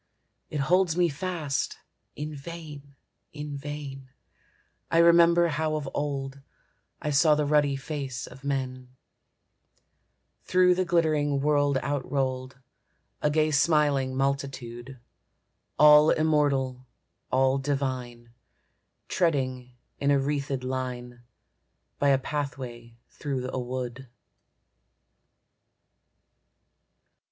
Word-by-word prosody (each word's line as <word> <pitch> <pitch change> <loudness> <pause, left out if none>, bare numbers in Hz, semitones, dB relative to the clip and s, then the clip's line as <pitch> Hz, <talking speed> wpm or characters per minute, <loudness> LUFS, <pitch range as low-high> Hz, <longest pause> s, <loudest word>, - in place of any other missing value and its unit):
It 150 - -2
holds 180 +3 +2
me 175 -1 +3
fast. 155 -3 -3 0.4
In 150 +1 -5
vain, 145 -2 -9 0.4
in 150 -1 -6
vain, 140 -2 -7 0.8
I 165 - +1
remember 170 0 +6
how 155 0 -1
of 150 -2 -3
old 140 -1 -3 0.6
I 150 - -2
saw 150 +2 +5
the 150 0 0
ruddy 145 -2 +2
race 135 -5 -4
of 135 +2 -13
men, 130 -2 -4 1.5
Through 180 0 +4
the 185 +1 0
glittering 155 -5 +1
world 145 -1 +2
outrolled, 130 -2 -2 0.6
A 150 - +2
gay 155 +1 +2
smiling 145 -3 +2
multitude, 135 -2 -3 0.8
All 150 +1 +8
immortal, 140 -5 +1 0.4
all 130 +1 +3
divine, 130 -4 -3 0.7
Treading 130 -7 -1 0.2
in 140 - +1
a 140 - +5
wreathèd 140 -1 -2
line 125 -2 -4 0.8
By 145 - +3
a 135 - +5
pathway 130 -5 -5
through 130 -3 -4
a - - -1
wood. 125 +1 -5
140 Hz, 95 wpm, -27 LUFS, 130-150 Hz, 1.5 s, All